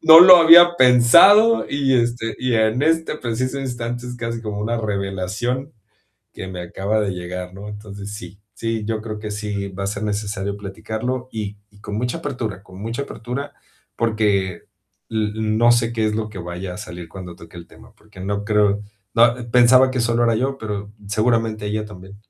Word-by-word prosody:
No 160 +1 +9
lo 180 0 +10
había 175 +1 +8
pensado 170 - +6
y, 135 -2 +1
este, 120 -2 -1
y 125 -2 -1
en 110 +4 +1
este 160 0 +1
preciso 130 +3 -3
instante, 120 -1 -5
es 125 0 -7
casi 115 -1 -4
como 105 -2 -5
una 115 +2 -2
revelación 105 - -3 0.6
que 95 - -8
me 90 -1 -6
acaba 100 +5 -2
de 105 -2 -1
llegar, 90 0 -7
¿no? 100 +2 -9
Entonces, 105 -1 -9
sí. 95 0 -10 0.2
Sí, 115 -2 -3
yo 110 0 -3
creo 110 -2 -6
que 105 0 -7
sí 105 -1 -4
va 95 +1 -7
a - - -2
ser 105 +1 -4
necesario 100 -1 -3
platicarlo 110 +6 -5
y 105 -2 -5
y 105 0 -21
con 105 -1 -6
mucha 125 +6 -2
apertura 115 - -5
con 95 -1 -14
mucha 115 +5 -4
apertura, 125 +3 -6 0.4
porque 105 -6 0 0.5
l 110 -1 -1
n 110 0 -1
no 120 0 +5
sé 115 0 +1
qué 110 -1 0
es 105 - -1
lo 110 0 -3
que 100 - -9
vaya 90 +1 -6
a - - -9
salir 90 -4 -9
cuando 90 -1 -9
toque 85 +1 -14
el 85 - -11
tema, 115 0 -18
porque 105 -4 -17
no 100 +2 -3
creo 105 -1 +2 0.3
no, 120 +1 +5 0.2
pensaba 125 +2 +5
que 130 - -2
solo 115 0 +1
era 115 -1 +2
yo, 135 +3 -1
pero, 105 -1 -6 0.2
seguramente 110 -1 0
ella 105 +1 -2
también 100 -1 -12
110 Hz, 190 wpm, -20 LUFS, 100-120 Hz, 0.6 s, lo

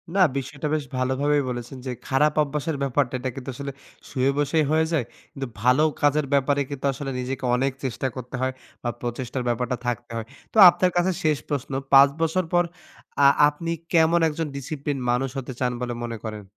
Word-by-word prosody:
না, - - +2 0.2
বিষয়টা 140 +3 -4
বেশ 155 - -1
ভালোভাবেই 140 +3 +1
বলেছেন 120 +2 -5
যে, 130 - -2 0.2
"খারাপ 145 +3 +3
অভ্যাসের 150 +1 -3
ব্যাপারটা 135 -1 0
এটা 130 +1 -2
কিন্তু 135 0 -7
আসলে 140 +1 -5 0.4
শুয়ে 130 +1 +1
বসেই 150 +2 +2
হয়ে 160 0 +3
যায়। 145 -8 +1 0.3
কিন্তু 135 -1 -5
ভালো 125 +5 +4 0.2
কাজের 145 0 +3
ব্যাপারে 140 +1 +2
কিন্তু 140 -1 -5
আসলে 135 0 -5
নিজেকে 130 +1 -3
অনেক 135 +2 +1
চেষ্টা 130 0 -2
করতে 125 0 -7
হয় 130 0 0 0.3
বা 120 - 0
প্রচেষ্টার 125 +1 -3
ব্যাপারটা 120 +1 -1
থাকতে 120 0 -3
হয়।" 115 - -4 0.3
তো - - -3
আপনার 180 +1 +1
কাছে 180 +2 +3
শেষ 155 -2 +3
প্রশ্ন। 140 -1 -3 0.2
৫ 140 +1 +9
বছর 165 +3 +1
পর 175 0 +5 0.6
আ - - +10 0.2
আপনি 165 +3 -5 0.2
কেমন 165 +1 +5
একজন 160 +1 -3
ডিসিপ্লিন 140 0 -4
মানুষ 130 +2 0
হতে 130 -1 -5
চান 125 -1 +1
বলে 125 -1 -2
মনে 115 -1 -4
করেন? 110 -1 -5
135 Hz, 185 wpm, -24 LUFS, 125-150 Hz, 0.6 s, আ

